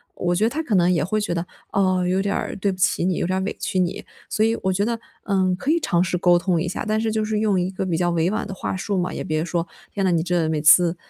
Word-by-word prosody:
我 175 Hz, 0 st, 0 dB
觉 200 Hz, +5 st, +2 dB
得 225 Hz, -, +3 dB
他 315 Hz, +5 st, -3 dB
可 235 Hz, -10 st, 0 dB
能 175 Hz, -1 st, +4 dB
也 170 Hz, -5 st, +2 dB
会 215 Hz, +6 st, 0 dB
觉 210 Hz, -4 st, -2 dB
得， 170 Hz, 0 st, -2 dB, 0.3 s
哦， 185 Hz, -2 st, +2 dB
有 185 Hz, +2 st, +1 dB
点 200 Hz, 0 st, -1 dB
儿 -, -, -3 dB
对 195 Hz, +1 st, 0 dB
不 185 Hz, -, -7 dB
起 185 Hz, -, +1 dB
你， 185 Hz, 0 st, +1 dB
有 170 Hz, -, -1 dB
点 185 Hz, +1 st, 0 dB
儿 -, -, -1 dB
委 200 Hz, -, -2 dB
屈 190 Hz, -, -2 dB
你。 180 Hz, -1 st, -1 dB, 0.2 s
所 215 Hz, -, +2 dB
以 225 Hz, +1 st, +2 dB
我 190 Hz, -, +2 dB
觉 200 Hz, +2 st, 0 dB
得， 235 Hz, 0 st, -1 dB, 0.3 s
嗯， 190 Hz, -2 st, +2 dB
可 265 Hz, -, -4 dB
以 335 Hz, -, +3 dB
尝 175 Hz, -, +1 dB
试 180 Hz, 0 st, 0 dB
沟 175 Hz, 0 st, +4 dB
通 175 Hz, -2 st, 0 dB
一 175 Hz, -, -2 dB
下， 185 Hz, -, -4 dB
但 215 Hz, 0 st, +1 dB
是 225 Hz, -1 st, 0 dB
就 215 Hz, 0 st, 0 dB
是 215 Hz, 0 st, -1 dB
用 210 Hz, -3 st, +2 dB
一 180 Hz, +1 st, -1 dB
个 190 Hz, 0 st, -4 dB
比 170 Hz, -3 st, -1 dB
较 175 Hz, 0 st, +1 dB
委 170 Hz, +1 st, +1 dB
婉 215 Hz, -, -2 dB
的 195 Hz, -, -6 dB
话 190 Hz, -, -4 dB
术 200 Hz, +1 st, -2 dB
嘛， 180 Hz, 0 st, -1 dB
也 -, -, -4 dB
别 155 Hz, 0 st, -1 dB
说， 170 Hz, 0 st, -2 dB, 0.3 s
天 195 Hz, -2 st, -1 dB
呐， 185 Hz, -, +3 dB
你 165 Hz, -1 st, +2 dB
真 180 Hz, 0 st, 0 dB
的 160 Hz, -, 0 dB
每 155 Hz, -1 st, -1 dB
次， 170 Hz, +3 st, +6 dB
185 Hz, 340 characters per minute, -22 LUFS, 175-205 Hz, 0.3 s, 次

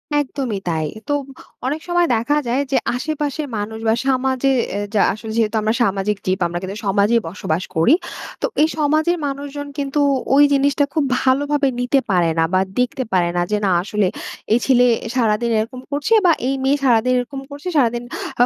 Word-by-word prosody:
একদমই 265 Hz, -7 st, -1 dB
তাই। 160 Hz, -2 st, -1 dB, 0.2 s
তো 290 Hz, -, 0 dB, 0.5 s
অনেক 295 Hz, +4 st, -2 dB
সময় 350 Hz, -1 st, +2 dB
দেখা 235 Hz, +7 st, 0 dB
যায় 255 Hz, +4 st, +1 dB
যে, 265 Hz, -, +3 dB, 0.2 s
আশেপাশের 295 Hz, +1 st, -3 dB
মানুষ 220 Hz, +2 st, -4 dB
বা 220 Hz, -, +4 dB
সমাজে 265 Hz, 0 st, +1 dB, 0.3 s
এ -, -, -1 dB, 0.2 s
যা -, -, +4 dB
আসলে 220 Hz, +1 st, -7 dB
যেহেতু 225 Hz, 0 st, +1 dB
আমরা 215 Hz, +1 st, +1 dB
সামাজিক 200 Hz, 0 st, 0 dB
জীব, 185 Hz, +1 st, 0 dB
আমরা 175 Hz, +1 st, -4 dB
কিন্তু 195 Hz, +2 st, -5 dB
সমাজেই 205 Hz, +4 st, +3 dB
বসবাস 170 Hz, -1 st, -2 dB
করি। 165 Hz, -, +4 dB, 0.5 s
তো -, -, +1 dB, 0.2 s
এই 310 Hz, -, +5 dB
সমাজের 310 Hz, +3 st, +2 dB
মানুষজন 285 Hz, +1 st, -5 dB
কিন্তু 280 Hz, 0 st, -1 dB, 0.4 s
ওই 290 Hz, -, +7 dB
জিনিসটা 280 Hz, +1 st, +2 dB
খুব 310 Hz, -, +1 dB, 0.2 s
ভালোভাবে 285 Hz, +2 st, +2 dB
নিতে 250 Hz, +3 st, +2 dB
পারে 175 Hz, -2 st, +3 dB
না 165 Hz, -, +4 dB
বা 185 Hz, -, +4 dB, 0.2 s
দেখতে 250 Hz, +1 st, 0 dB
পারে 175 Hz, -2 st, +3 dB
না। -, -, +2 dB
যে 210 Hz, -, +2 dB
না 190 Hz, -, +2 dB
আসলে 205 Hz, -1 st, 0 dB, 0.5 s
এই 235 Hz, -, +4 dB
ছেলে 250 Hz, -2 st, +4 dB, 0.3 s
সারাদিন 235 Hz, -1 st, +1 dB
এরকম 240 Hz, +4 st, -4 dB
করছে 290 Hz, +10 st, 0 dB
বা 345 Hz, -, +6 dB, 0.2 s
এই 270 Hz, -, +1 dB
মেয়ে 275 Hz, +2 st, +3 dB
সারাদিন 250 Hz, 0 st, +3 dB
এরকম 270 Hz, +3 st, -5 dB
করছে, 285 Hz, +4 st, -9 dB
সারাদিন 240 Hz, -3 st, +2 dB, 0.4 s
আ -, -, +6 dB
255 Hz, 180 wpm, -20 LUFS, 210-285 Hz, 0.5 s, ওই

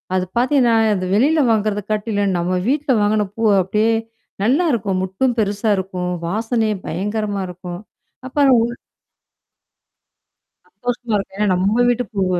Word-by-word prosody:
அது 185 Hz, -1 st, +1 dB
பாத்தீங்கன்னா, 250 Hz, -1 st, +3 dB, 0.2 s
இந்த 185 Hz, -1 st, -3 dB
வெளியில 300 Hz, +8 st, +3 dB
வாங்குறத 210 Hz, -1 st, 0 dB
காட்டிலும் 205 Hz, -2 st, 0 dB
நம்ம 175 Hz, +2 st, -1 dB, 0.2 s
வீட்ல 290 Hz, 0 st, 0 dB
வாங்குன 210 Hz, 0 st, +1 dB
பூ 230 Hz, -, -4 dB, 0.2 s
அப்டியே 215 Hz, +5 st, +1 dB, 0.5 s
நல்லாருக்கும். 235 Hz, -, +1 dB
மொட்டும் 235 Hz, +7 st, -1 dB
பெருசா 205 Hz, +1 st, 0 dB
இருக்கும், 180 Hz, -1 st, -3 dB, 0.2 s
வாசனையும் 220 Hz, 0 st, -1 dB
பயங்கரமா 205 Hz, +1 st, -2 dB
இருக்கும். 180 Hz, 0 st, -8 dB, 0.5 s
அப்பறம் 270 Hz, -2 st, +4 dB
உள் 240 Hz, +1 st, -4 dB, 1.9 s
சந்தோஷமா 245 Hz, -2 st, -4 dB
இருக்கும். 195 Hz, -1 st, -3 dB
ஏன்னா 210 Hz, -, +2 dB, 0.2 s
நம்ம 220 Hz, +5 st, +2 dB
வீட்டு 245 Hz, 0 st, +1 dB
பூவ்வு, 185 Hz, -3 st, 0 dB
215 Hz, 125 wpm, -19 LUFS, 195-240 Hz, 1.9 s, அப்பறம்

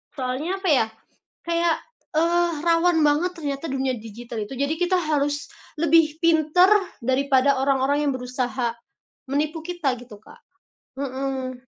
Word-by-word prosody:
Soalnya 280 Hz, +9 st, -3 dB
apa 380 Hz, -, 0 dB
ya, 265 Hz, -7 st, +4 dB, 0.6 s
kayak, 335 Hz, -1 st, +1 dB, 0.4 s
eee, 340 Hz, +2 st, +2 dB
rawan 335 Hz, 0 st, +3 dB
banget 300 Hz, +5 st, +2 dB
ternyata 290 Hz, -2 st, -4 dB
dunia 265 Hz, -2 st, -1 dB
digital 225 Hz, 0 st, -7 dB
itu, 240 Hz, -, -8 dB
jadi 280 Hz, +4 st, 0 dB
kita 360 Hz, +1 st, +2 dB
harus 290 Hz, -2 st, -1 dB, 0.3 s
lebih 320 Hz, -1 st, +3 dB
pintar 330 Hz, +2 st, +4 dB, 0.3 s
daripada 265 Hz, +2 st, +2 dB
orang-orang 275 Hz, +2 st, +1 dB
yang 280 Hz, -, +2 dB
berusaha, 250 Hz, -2 st, -2 dB, 0.5 s
menipu 305 Hz, +4 st, -2 dB
kita 340 Hz, -6 st, -1 dB
gitu 230 Hz, -4 st, -13 dB
Kak, -, -, -17 dB, 0.5 s
mhm. 265 Hz, -1 st, -4 dB
285 Hz, 130 wpm, -23 LUFS, 260-330 Hz, 0.6 s, ya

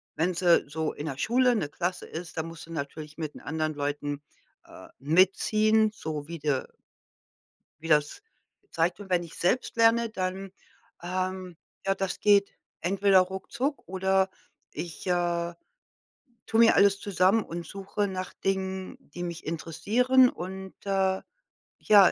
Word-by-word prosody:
wenn 175 Hz, +3 st, +1 dB
sie 175 Hz, -1 st, +4 dB
so 155 Hz, +2 st, -2 dB
in 150 Hz, -, -6 dB
'ner 135 Hz, -3 st, -4 dB
Schule 250 Hz, -, +3 dB
'ne 155 Hz, -10 st, -1 dB
Klasse 180 Hz, +3 st, -3 dB
ist, 165 Hz, 0 st, -8 dB
dann 160 Hz, 0 st, -2 dB
musst 165 Hz, -1 st, -9 dB
du 165 Hz, -, -13 dB
natürlich 150 Hz, +1 st, -6 dB
mit 155 Hz, -3 st, -4 dB
den -, -, -11 dB
anderen 155 Hz, 0 st, -2 dB
Leuten, 145 Hz, 0 st, -3 dB, 0.4 s
äh, -, -, -13 dB
mitziehen, 215 Hz, -, +3 dB
so 155 Hz, -7 st, -5 dB
wie 170 Hz, 0 st, -6 dB
der 145 Hz, -3 st, -1 dB, 1.1 s
wie 165 Hz, -, -7 dB
das 150 Hz, -, +2 dB, 0.5 s
zeigt. 170 Hz, +4 st, 0 dB
Und 195 Hz, -2 st, -10 dB
wenn 180 Hz, -1 st, +3 dB
ich 170 Hz, -, -10 dB
selbst 230 Hz, +9 st, 0 dB
lerne, 230 Hz, 0 st, +4 dB
dann 190 Hz, -1 st, -3 dB, 0.5 s
ähm, 185 Hz, 0 st, -3 dB, 0.3 s
ja, 195 Hz, -, +3 dB
das 195 Hz, -1 st, -3 dB
geht 200 Hz, -1 st, +4 dB, 0.3 s
entweder 195 Hz, +2 st, +4 dB
ruckzuck 190 Hz, +10 st, -2 dB
oder 190 Hz, +1 st, +1 dB, 0.4 s
ich, 170 Hz, +1 st, -7 dB
äh, 175 Hz, -1 st, 0 dB, 0.9 s
tue 225 Hz, -, +1 dB
mir 230 Hz, -1 st, +7 dB
alles 200 Hz, 0 st, +5 dB
zusammen 200 Hz, +2 st, +2 dB
und 170 Hz, 0 st, -6 dB
suche 200 Hz, +3 st, -3 dB
nach 185 Hz, -1 st, -5 dB
Dingen, 190 Hz, -1 st, -3 dB
die 175 Hz, +5 st, -9 dB
mich 170 Hz, -1 st, -6 dB
interessieren. 230 Hz, +11 st, +3 dB
Und, 190 Hz, 0 st, -7 dB
äh, 190 Hz, -1 st, +1 dB, 0.6 s
ja 200 Hz, -3 st, +7 dB
185 Hz, 145 wpm, -28 LUFS, 165-195 Hz, 1.1 s, mir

